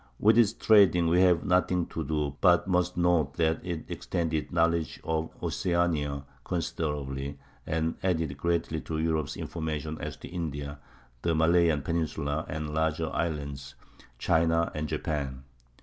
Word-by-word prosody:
With 110 Hz, +1 st, +5 dB
its 110 Hz, -3 st, +5 dB
trading 100 Hz, -7 st, +5 dB
we 90 Hz, +2 st, +4 dB
have 90 Hz, -3 st, +4 dB
nothing 90 Hz, -1 st, +2 dB
to 80 Hz, -, -3 dB
do, 75 Hz, -1 st, -2 dB
but 90 Hz, -3 st, +5 dB
must 90 Hz, -1 st, +1 dB
note 85 Hz, -6 st, +2 dB
that 80 Hz, -1 st, +1 dB
it 85 Hz, -3 st, -4 dB
extended 80 Hz, -3 st, -2 dB
knowledge 85 Hz, -4 st, +1 dB
of 80 Hz, 0 st, -1 dB
Oceanica 80 Hz, -3 st, 0 dB, 0.2 s
considerably, 70 Hz, -5 st, -3 dB, 0.3 s
and 80 Hz, +1 st, 0 dB
added 80 Hz, -6 st, 0 dB
greatly 80 Hz, 0 st, -1 dB
to 80 Hz, -, -4 dB
Europe's 80 Hz, -3 st, -1 dB
information 80 Hz, -1 st, -4 dB
as -, -, -5 dB
to -, -, -10 dB
India, 75 Hz, -4 st, -5 dB, 0.4 s
the 85 Hz, -1 st, +1 dB
Malayan 80 Hz, -2 st, +3 dB
peninsula 80 Hz, -1 st, -2 dB
and 75 Hz, -1 st, -4 dB
larger 80 Hz, 0 st, 0 dB
islands, 70 Hz, -4 st, -3 dB, 0.4 s
China, 80 Hz, +3 st, +2 dB
and 75 Hz, 0 st, -3 dB
Japan. 70 Hz, -4 st, -3 dB
80 Hz, 135 wpm, -28 LUFS, 75-85 Hz, 0.4 s, With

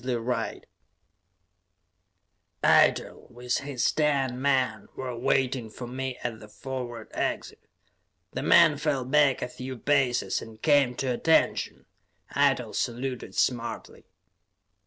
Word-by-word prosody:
Eitel, -, -, +3 dB
with 125 Hz, 0 st, -2 dB
his 140 Hz, -3 st, -1 dB
ten 135 Hz, -4 st, 0 dB
men, 130 Hz, -7 st, +1 dB
were 125 Hz, -2 st, -5 dB
waiting 130 Hz, -1 st, 0 dB
for 120 Hz, +3 st, -8 dB
me 130 Hz, +1 st, -4 dB
at 115 Hz, -2 st, -4 dB
the 105 Hz, -, -12 dB
forward 120 Hz, -1 st, -6 dB
exit. -, -, -4 dB, 0.7 s
The -, -, -3 dB
men 155 Hz, -4 st, +6 dB
fell 140 Hz, -4 st, -1 dB
back 140 Hz, 0 st, +3 dB
a -, -, -2 dB
few 130 Hz, +1 st, -7 dB
paces 135 Hz, -1 st, +1 dB
and 110 Hz, -1 st, -11 dB
came 145 Hz, -5 st, +3 dB
to 130 Hz, -1 st, -1 dB
attention; 160 Hz, +6 st, +1 dB, 0.5 s
Eitel -, -, +2 dB
saluted 125 Hz, +1 st, -3 dB
smartly. 120 Hz, -2 st, -2 dB
130 Hz, 110 wpm, -27 LUFS, 120-135 Hz, 0.7 s, men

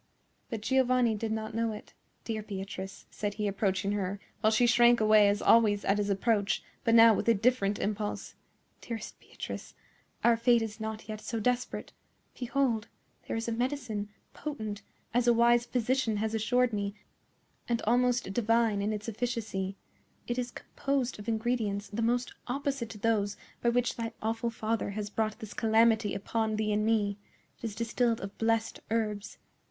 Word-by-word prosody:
But 225 Hz, -4 st, -4 dB
Giovanni 255 Hz, -1 st, +3 dB
did 220 Hz, +1 st, -3 dB
not 220 Hz, 0 st, -3 dB
know 225 Hz, 0 st, 0 dB
it. 210 Hz, -, -10 dB, 0.3 s
"Dear 220 Hz, -2 st, -3 dB
Beatrice," 195 Hz, -1 st, -6 dB
said 205 Hz, -1 st, -3 dB
he, 210 Hz, -1 st, -1 dB
approaching 195 Hz, 0 st, 0 dB
her, 200 Hz, -1 st, -2 dB, 0.2 s
while 215 Hz, -, +4 dB
she 220 Hz, +3 st, +4 dB
shrank 240 Hz, 0 st, +6 dB
away 215 Hz, -1 st, +6 dB
as 205 Hz, 0 st, 0 dB
always 215 Hz, -3 st, +5 dB
at 195 Hz, +1 st, +2 dB
his 205 Hz, 0 st, 0 dB
approach, 200 Hz, +1 st, +1 dB, 0.2 s
but 230 Hz, -, +4 dB
now 230 Hz, -1 st, +9 dB
with 225 Hz, -, 0 dB
a 230 Hz, -, +6 dB
different 205 Hz, -2 st, +2 dB
impulse, 210 Hz, 0 st, -3 dB, 0.5 s
"dearest 230 Hz, -2 st, -6 dB
Beatrice, -, -, -8 dB, 0.5 s
our 235 Hz, 0 st, +6 dB
fate 235 Hz, 0 st, +4 dB
is 220 Hz, 0 st, -6 dB
not 220 Hz, 0 st, -5 dB
yet 215 Hz, -1 st, -6 dB
so 230 Hz, -, -3 dB
desperate. 250 Hz, +3 st, -1 dB, 0.5 s
Behold! 245 Hz, -3 st, 0 dB, 0.4 s
there -, -, -2 dB
is 225 Hz, -, -3 dB
a -, -, 0 dB
medicine, 240 Hz, -4 st, -2 dB, 0.2 s
potent, 215 Hz, -9 st, -5 dB, 0.3 s
as 245 Hz, 0 st, +2 dB
a 240 Hz, -, +7 dB
wise 235 Hz, +1 st, +4 dB
physician 250 Hz, -2 st, +1 dB
has 220 Hz, +1 st, -1 dB
assured 245 Hz, +2 st, +2 dB
me, 200 Hz, -1 st, -2 dB, 0.7 s
and 235 Hz, -1 st, 0 dB
almost 245 Hz, -2 st, +2 dB
divine 230 Hz, -2 st, +2 dB
in 205 Hz, +2 st, 0 dB
its 210 Hz, 0 st, -4 dB
efficacy. 215 Hz, -4 st, -3 dB, 0.5 s
It 240 Hz, +1 st, -2 dB
is 245 Hz, 0 st, -2 dB
composed 265 Hz, -2 st, -2 dB
of 205 Hz, -, -9 dB
ingredients 220 Hz, -3 st, -1 dB
the 215 Hz, +2 st, -3 dB
most 245 Hz, +2 st, 0 dB
opposite 275 Hz, -2 st, -2 dB
to 225 Hz, -, -8 dB
those 205 Hz, -1 st, +1 dB, 0.2 s
by 235 Hz, -, +3 dB
which 245 Hz, +1 st, +1 dB
thy 230 Hz, -1 st, -3 dB
awful 225 Hz, +2 st, -1 dB
father 225 Hz, -1 st, -2 dB
has 210 Hz, -1 st, -3 dB
brought 215 Hz, -1 st, -1 dB
this 215 Hz, -2 st, -8 dB
calamity 225 Hz, -3 st, +3 dB
upon 220 Hz, +2 st, -1 dB
thee 215 Hz, 0 st, 0 dB
and 210 Hz, +1 st, +1 dB
me. 205 Hz, -3 st, +1 dB, 0.4 s
It -, -, -7 dB
is 215 Hz, -3 st, -4 dB
distilled 230 Hz, 0 st, +1 dB
of 195 Hz, +1 st, -6 dB
blessed 225 Hz, 0 st, +1 dB
herbs. 215 Hz, -2 st, -2 dB
225 Hz, 170 wpm, -30 LUFS, 210-235 Hz, 0.7 s, now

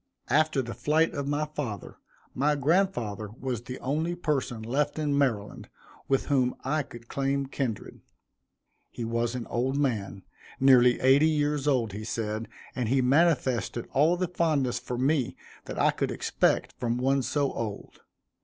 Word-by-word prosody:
After 155 Hz, -1 st, +3 dB
the 120 Hz, 0 st, -6 dB
flight 160 Hz, +2 st, +1 dB
of 140 Hz, -1 st, -3 dB
my 145 Hz, +1 st, 0 dB
father, 145 Hz, -9 st, -6 dB, 0.4 s
my 150 Hz, +3 st, +2 dB
grandfather 135 Hz, -, 0 dB
was 125 Hz, -4 st, -3 dB
the 125 Hz, +1 st, -7 dB
only 155 Hz, +6 st, -1 dB
person 140 Hz, -9 st, -2 dB
left 140 Hz, +7 st, -1 dB
in 150 Hz, -2 st, 0 dB
Maryland 120 Hz, -8 st, -1 dB, 0.4 s
with 135 Hz, -1 st, +1 dB
whom 130 Hz, -3 st, +1 dB
I 150 Hz, +4 st, 0 dB
could 120 Hz, -4 st, -11 dB
claim 140 Hz, +1 st, -1 dB
kindred. 130 Hz, -5 st, -4 dB, 0.9 s
He 120 Hz, -, -5 dB
was 115 Hz, +1 st, -1 dB
an 125 Hz, -, -4 dB
old 130 Hz, +3 st, -1 dB
man, 105 Hz, -9 st, -1 dB, 0.4 s
nearly 125 Hz, -2 st, +6 dB
eighty 135 Hz, +4 st, +5 dB
years 150 Hz, -2 st, 0 dB
old, 120 Hz, -8 st, +1 dB
he 105 Hz, +2 st, -5 dB
said, 110 Hz, 0 st, -3 dB, 0.3 s
and 125 Hz, -4 st, -1 dB
he 135 Hz, +2 st, +3 dB
manifested 130 Hz, -4 st, +2 dB
all 160 Hz, +6 st, +3 dB
the 185 Hz, 0 st, 0 dB
fondness 150 Hz, -8 st, 0 dB
for 125 Hz, 0 st, -5 dB
me 135 Hz, 0 st, +1 dB, 0.3 s
that -, -, -6 dB
I -, -, +4 dB
could -, -, -2 dB
expect -, -, 0 dB
from 120 Hz, -1 st, 0 dB
one 135 Hz, +2 st, +2 dB
so 140 Hz, +2 st, 0 dB
old. 110 Hz, -3 st, -6 dB
135 Hz, 155 wpm, -28 LUFS, 120-145 Hz, 0.9 s, nearly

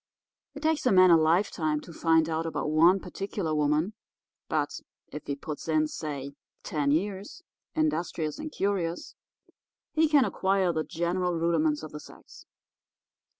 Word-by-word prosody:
It 290 Hz, -, -8 dB
takes 315 Hz, -3 st, +1 dB
a -, -, +4 dB
man 185 Hz, -2 st, +7 dB
a -, -, +9 dB
lifetime 160 Hz, -1 st, +2 dB
to 170 Hz, -, -12 dB
find 160 Hz, -1 st, +3 dB
out 165 Hz, 0 st, -2 dB
about 155 Hz, -1 st, -2 dB
one 170 Hz, +5 st, +5 dB
particular 195 Hz, -4 st, -4 dB
woman; 150 Hz, +6 st, +1 dB, 0.6 s
but -, -, 0 dB, 0.4 s
if 150 Hz, -, -8 dB
he 140 Hz, -, -1 dB
puts 150 Hz, +2 st, -7 dB
in, 155 Hz, -1 st, +2 dB
say, 145 Hz, -3 st, -5 dB, 0.3 s
ten 145 Hz, -2 st, -1 dB
years, 195 Hz, -, -2 dB, 0.3 s
industrious 175 Hz, -, -1 dB
and 310 Hz, 0 st, -6 dB
curious, 185 Hz, -, -2 dB, 0.8 s
he 320 Hz, 0 st, +3 dB
can 290 Hz, -4 st, +4 dB
acquire 190 Hz, -2 st, +1 dB
the 160 Hz, -1 st, -1 dB
general 175 Hz, +2 st, -1 dB
rudiments 160 Hz, -2 st, +1 dB
of 155 Hz, -, -7 dB
the 150 Hz, -, -7 dB
sex. -, -, -15 dB
165 Hz, 150 wpm, -28 LUFS, 155-195 Hz, 0.8 s, a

